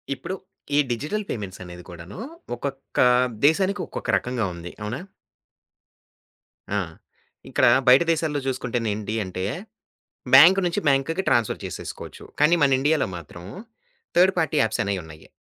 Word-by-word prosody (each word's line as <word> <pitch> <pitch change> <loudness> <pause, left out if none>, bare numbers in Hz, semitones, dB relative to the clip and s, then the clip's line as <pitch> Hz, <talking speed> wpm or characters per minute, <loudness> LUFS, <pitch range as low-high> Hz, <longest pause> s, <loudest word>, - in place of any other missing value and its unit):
ఇప్పుడు 190 - -5 0.4
ఈ - - +5
digital 155 - -2
payments 100 -4 -5
అనేది 90 0 -10
కూడాను 85 - -10 0.4
ఒక్కొక్క 135 +2 -6 0.5
దేశానికి 190 +5 +2
ఒక్కొక్క - - -7
రకంగా 125 -3 -2
ఉంది. 85 +1 -8
అవునా? 105 +5 -4 1.8
ఆ! - - 0 0.7
ఇక్కడ - - +2 0.2
బయట 130 +5 +8
దేశాల్లో 155 -3 0
చూసుకుంటేనేంటి 115 -4 -2
అంటే, 95 0 -4 0.9
బ్యాంక్ 190 +3 +9
నుంచి 170 - -1
బ్యాంక్‌కి 160 +7 +1
ట్రాన్స్‌ఫర్ 115 -3 +1
చేసేసుకోవచ్చు. - - -8 0.2
కానీ, 170 +3 +5
మన 135 - +4
ఇండియాలో 150 -1 +2
మాత్రం 85 +1 -11 0.7
థర్డ్ 190 +2 +6
పార్టీ 160 -1 0
యాప్స్ 110 -1 0
అనేయి 100 -1 -2
ఉన్నాయి. 80 -1 -13
125 Hz, 125 wpm, -24 LUFS, 100-160 Hz, 1.8 s, బ్యాంక్